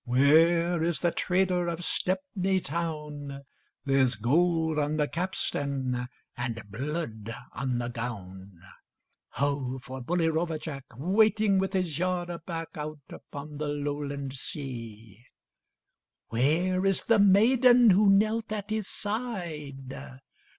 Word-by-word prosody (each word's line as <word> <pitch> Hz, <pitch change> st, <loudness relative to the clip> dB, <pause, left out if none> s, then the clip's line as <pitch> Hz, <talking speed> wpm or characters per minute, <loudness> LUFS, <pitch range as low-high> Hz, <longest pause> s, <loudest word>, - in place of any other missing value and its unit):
Where 165 Hz, +7 st, +4 dB
is 165 Hz, 0 st, 0 dB
the 175 Hz, -, +2 dB
trader 180 Hz, -1 st, +1 dB
of 170 Hz, 0 st, -3 dB
Stepney 190 Hz, -, 0 dB
town? 150 Hz, -4 st, -4 dB, 0.4 s
There's 135 Hz, -3 st, +3 dB
gold 160 Hz, +6 st, +2 dB
on 150 Hz, +1 st, 0 dB
the 150 Hz, -1 st, +2 dB
capstan, 140 Hz, -8 st, -2 dB, 0.3 s
and 120 Hz, -2 st, -4 dB
blood 115 Hz, -3 st, -4 dB, 0.2 s
on 130 Hz, -2 st, -1 dB
the 120 Hz, 0 st, -2 dB
gown: 100 Hz, -6 st, -7 dB, 0.7 s
Ho 140 Hz, -1 st, -1 dB
for 130 Hz, +1 st, -8 dB
bully 165 Hz, +6 st, +1 dB
rover 160 Hz, 0 st, 0 dB
Jack, 140 Hz, -3 st, -7 dB
Waiting 210 Hz, -, +3 dB
with 190 Hz, +1 st, -1 dB
his 175 Hz, -5 st, -1 dB
yard 180 Hz, -1 st, -1 dB
aback, 165 Hz, -1 st, -5 dB
Out 150 Hz, 0 st, -5 dB
upon 145 Hz, +1 st, -9 dB
the 150 Hz, -, -2 dB
Lowland 145 Hz, -1 st, -3 dB
sea! 115 Hz, -7 st, -7 dB, 1.1 s
Where 165 Hz, +10 st, +2 dB
is 195 Hz, -1 st, +2 dB
the 225 Hz, -2 st, +3 dB
maiden 235 Hz, +4 st, +6 dB
who 200 Hz, +2 st, +5 dB
knelt 215 Hz, +3 st, +3 dB
at 210 Hz, -1 st, -4 dB
his 215 Hz, -2 st, -1 dB
side? 170 Hz, -, -4 dB
155 Hz, 120 wpm, -28 LUFS, 135-185 Hz, 1.1 s, maiden